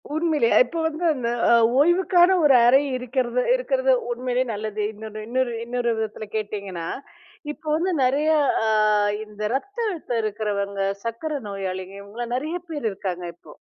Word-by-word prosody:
உண்மையிலே 310 -7 +2 0.2
இப்போ 335 - -5
வந்து 320 +2 -5
அந்த 250 -5 -2 0.2
அ, - - +6 0.3
ஓய்வுக்கான 350 +3 +4
ஒரு 275 -3 +6
அறை 265 +3 +6 0.2
இருக்கிறது 250 0 -1
இருக்கிறது - - +1 0.2
உண்மையிலே 250 +1 -1
நல்லது. 215 0 -4
இன்னொரு 215 0 -8
இன்னொரு 250 0 0
இன்னொரு 240 0 -1
விதத்துல 220 0 -4
கேட்டீங்கன்னா, 200 -5 -4 0.6
இப்போ 310 - -13
வந்து 355 +4 0
நெறைய 280 +5 +2 0.4
அ, - - +1 0.6
இந்த 210 0 -12
ரத்த 400 - -5
அழுத்தம் 310 - -3
இருக்கிறவங்க, 200 -2 -2 0.2
சர்க்கரை 280 +6 -3
நோயாளிகள் 190 0 -5
இவங்களை 210 +4 -6
நெறைய 310 +7 -2
பேர் 295 -7 -5
இருக்காங்க 185 -2 -5
இப்போ. - - -16
240 Hz, 140 wpm, -23 LUFS, 210-300 Hz, 0.6 s, அ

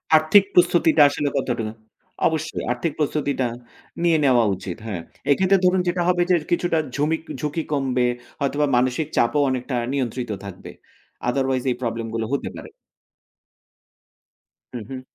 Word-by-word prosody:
আর্থিক 155 +6 +6
প্রস্তুতিটা 170 -3 +4
আসলে 145 0 -1
কতটুকু 115 -5 -2 0.6
অবশ্যই, 160 0 -3
আর্থিক 125 +6 -1
প্রস্তুতিটা 140 -3 0 0.6
নিয়ে 165 -2 +4
নেওয়া 125 -3 +5
উচিত 90 0 -7
হ্যাঁ। 95 -7 -4 0.3
এক্ষেত্রে 190 +6 +4
ধরুন, 185 +1 +4
যেটা 175 0 0
হবে 180 -1 +2
যে, 180 - +5 0.2
কিছুটা 175 -2 +1 0.2
ঝুমিক 155 +3 0 0.2
ঝুঁকি 150 +2 -2
কমবে। 130 -3 +1 0.3
হয়তোবা 145 +1 +1
মানসিক 130 +5 +1
চাপও 130 +5 +3
অনেকটা 125 0 -2 0.2
নিয়ন্ত্রিত 125 -3 -2
থাকবে। 95 -2 -9 0.6
otherwise 130 0 0
এই - - -1
প্রবলেম 115 -1 -3
গুলো 115 -1 -1
হতে 140 - -1
পারে। - - -9 2.0
হু, 120 - -4
হুম। 130 -1 -6
140 Hz, 135 wpm, -22 LUFS, 125-160 Hz, 2.0 s, আর্থিক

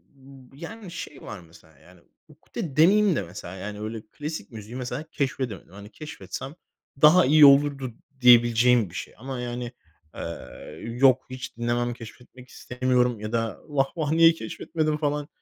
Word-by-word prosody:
b 135 -1 -17
yani 200 +2 -9
şey 150 -4 -8
var - - -8
mesela 80 -1 -19
yani 90 -1 -20 0.3
ukde 145 -5 -8
demeyeyim 195 +3 +5
de - - 0
mesela 90 0 -8
yani 105 +2 -7
öyle 110 0 -5
klasik 150 -7 -6
müziği 110 +2 -9
mesela 130 +3 -4
keşfedemedim. 130 -9 -3
Hani 100 +1 -11
keşfetsem 135 - -8 0.5
daha 160 +3 +7
iyi 150 +2 +7
olurdu 140 -2 +4 0.3
diyebileceğim 120 -2 +5
bir 85 - -13
şey. - - -6
Ama 130 +2 -6
yani, 120 0 -4 0.4
eee, 85 0 -8
"Yok 130 +2 +3
hiç 130 -1 -8
dinlemem, 120 +1 -1
keşfetmek 125 +2 -13
istemiyorum." 125 -2 0
ya 105 0 -5
da 115 -3 -2
"Vah, 140 -3 +1
vah! 155 -3 -1
Niye 165 +1 +7
keşfetmedim?" 155 +4 -3
falan, 145 -1 -1
125 Hz, 150 wpm, -25 LUFS, 115-145 Hz, 0.5 s, daha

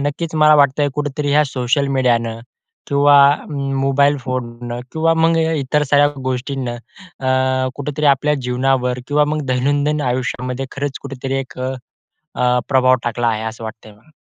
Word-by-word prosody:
नक्कीच 160 +3 -4
मला 155 -1 +5
वाटतंय 145 0 +3
कुठेतरी 145 0 -2
ह्या 150 +1 +4
सोशल 135 +1 0
मीडियानं 115 -3 +1 0.5
किंवा 145 0 +5 0.3
मोबाईल 140 0 +1
फोननं 120 -2 -5
किंवा 165 +1 +2
मग 165 0 +2
इतर 150 -3 0
साऱ्या 145 0 +5 0.2
गोष्टींनं 130 -1 -3 0.4
अ, 130 0 +1
कुठेतरी 150 +1 -2
आपल्या 145 +1 +3
जीवनावर 125 0 0
किंवा 150 0 +3
मग 155 - -2
दैनंदिन 145 +4 0
आयुष्यामध्ये 125 +1 -3
खरंच 140 -1 -4
कुठेतरी 135 -1 -5
एक 135 -1 -7 0.6
अ, 125 -5 -1
प्रभाव 130 -1 +4
टाकला 120 0 0
आहे, 110 -1 -1
असं 110 0 -6
वाटतंय 110 -1 -9
मला. 110 +9 -24
135 Hz, 140 wpm, -18 LUFS, 125-145 Hz, 0.6 s, मला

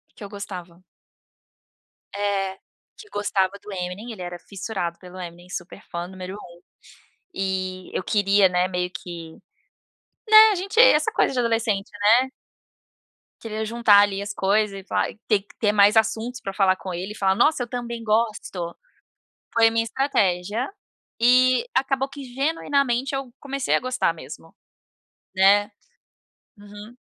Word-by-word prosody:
que - - -11
eu 200 - -8
gostava. 180 -4 -8 1.3
É. 195 -1 -1 0.4
Que 425 - -13
gostava 195 -2 0
do 210 - -10
Eminem. 190 +5 -5
Ele 195 -5 -9
era 175 0 -6
fissurado 190 -3 -5
pelo 185 0 -11
Eminem. 175 0 -9
Super 180 +2 -7
fã 175 0 -4
número 185 +1 -8
1. 175 -4 -13 0.7
E 185 -1 -3
eu - - -1
queria, 200 -2 +3
né, 180 0 +1
meio 180 -1 -2
que 170 -2 -8 1.0
né? 435 0 +9
A - - -2
gente 390 +5 -2
essa 470 -11 +6
coisa - - +1
de 250 - -1
adolescente, 225 -4 0
né? 235 +6 +4 1.1
Queria 220 -1 -4
juntar 220 -2 +5
ali 200 -1 0
as 205 0 -5
coisas 200 0 +1
e - - -12
falar - - 0
te 215 - -28
ter 210 -3 +3
que 200 - -22
ter 210 -2 +3
mais 205 +1 +5
assuntos 225 +3 0
pra 195 - -5
falar 190 -2 +3
com 185 -2 -6
ele, 185 +4 -5
e - - -13
falar: 190 -1 +2
"Nossa, 295 +1 +3
eu - - -7
também 235 -2 -5
gosto". 215 -6 -1 0.8
Foi 225 -1 +5
a - - +2
minha 225 0 +1
estratégia 220 -3 0 0.5
e 255 - +4
acabou 270 0 +1
que, 275 0 -9
genuinamente, 275 -3 0
eu 270 -3 -5
comecei 275 -1 -1
a - - +2
gostar 255 +1 0
mesmo. - - -11 0.8
Né? 200 +2 +4 0.9
Uhum. 205 +3 -12
205 Hz, 155 wpm, -23 LUFS, 190-240 Hz, 1.3 s, né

